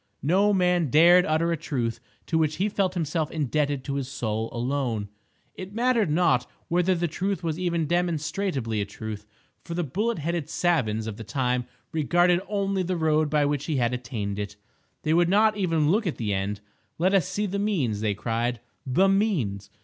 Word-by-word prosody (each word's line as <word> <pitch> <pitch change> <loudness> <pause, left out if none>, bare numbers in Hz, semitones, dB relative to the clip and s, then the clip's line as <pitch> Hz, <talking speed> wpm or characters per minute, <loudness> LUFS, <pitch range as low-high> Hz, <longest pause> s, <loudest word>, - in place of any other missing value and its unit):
No 190 +8 +3
man 180 -5 +2
dared 175 +5 +6
utter 160 +2 +1
a - - +2
truth 125 -7 -2 0.3
to 165 - -2
which 155 -1 +1
he 200 +3 0
felt 195 -2 0
himself 160 -2 -1
indebted 145 -2 -1
to 140 - -4
his 140 -2 -2
Soul 110 -4 -3
alone. 120 -4 -2 0.4
It 190 +2 -9
mattered 235 -5 +2
not 155 -6 +2 0.2
whether 180 +2 +2
the 175 0 0
truth 185 +3 -2
was 165 0 -2
even 170 -3 0
demonstrably 160 - -1
a - - -1
truth, 105 0 -7 0.4
for 170 - -6
the 175 - 0
bullet 210 - -1
headed 170 0 -2
savans 115 -12 +1
of 110 -2 -5
the 115 - -7
time 125 +2 -1 0.3
regarded 175 +3 +3
only 195 -2 0
the 180 0 -1
road 155 -1 +2
by 150 -1 +2
which 145 0 -1
he 155 - -1
had 120 -2 +1
attained 115 -5 -4
it. 100 0 -5 0.5
They 155 - +2
would 170 +1 +4
not 215 +2 +4
even 165 -6 +1
look 210 +1 +1
at 165 - -2
the 105 -3 -1
end. 100 +1 -2 0.4
"Let 185 +4 +2
us 190 -6 +3
see 210 - -2
the 200 0 -2
means," 150 - 0
they 105 -2 0
cried, 115 +3 -1 0.3
"the 185 +10 +3
means!" 170 - 0
155 Hz, 190 wpm, -26 LUFS, 125-180 Hz, 0.5 s, dared